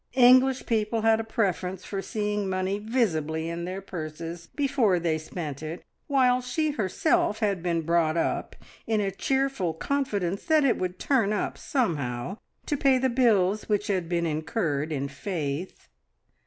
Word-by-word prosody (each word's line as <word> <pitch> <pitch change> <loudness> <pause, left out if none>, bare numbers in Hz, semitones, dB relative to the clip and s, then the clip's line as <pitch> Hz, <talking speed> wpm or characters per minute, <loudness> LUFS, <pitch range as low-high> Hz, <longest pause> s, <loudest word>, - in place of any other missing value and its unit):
English 255 +1 +6
people 220 0 0
had 225 0 +4
a - - -1
preference 190 -5 -1
for 195 -1 -3
seeing 210 -1 -2
money 185 +2 -1
visibly 165 - 0
in 170 +1 -4
their 185 +2 -5
purses 165 -1 -6
before 270 -9 +2
they 165 -2 0
spent 155 -3 -6
it, 160 +2 -6 0.2
while 255 -3 +3
she 300 +5 -1
herself 290 - +1
had 200 -5 0
been 170 -1 0
brought 165 0 +2
up 165 - -1 0.3
in 220 -1 +2
a 200 -1 0
cheerful 265 -6 0
confidence 205 -7 -1
that 315 -2 +4
it 255 - +2
would 180 0 -2
"turn 230 -5 +2
up" 210 - -1
somehow 155 - -1 0.3
to 295 - 0
pay 270 -2 +4
the 260 +1 +1
bills 215 -5 +2
which 205 -1 +1
had 185 -4 0
been 170 -1 0
incurred 155 -1 -1
in 140 -2 -1
faith. 150 +2 -4
195 Hz, 155 wpm, -27 LUFS, 170-245 Hz, 0.3 s, English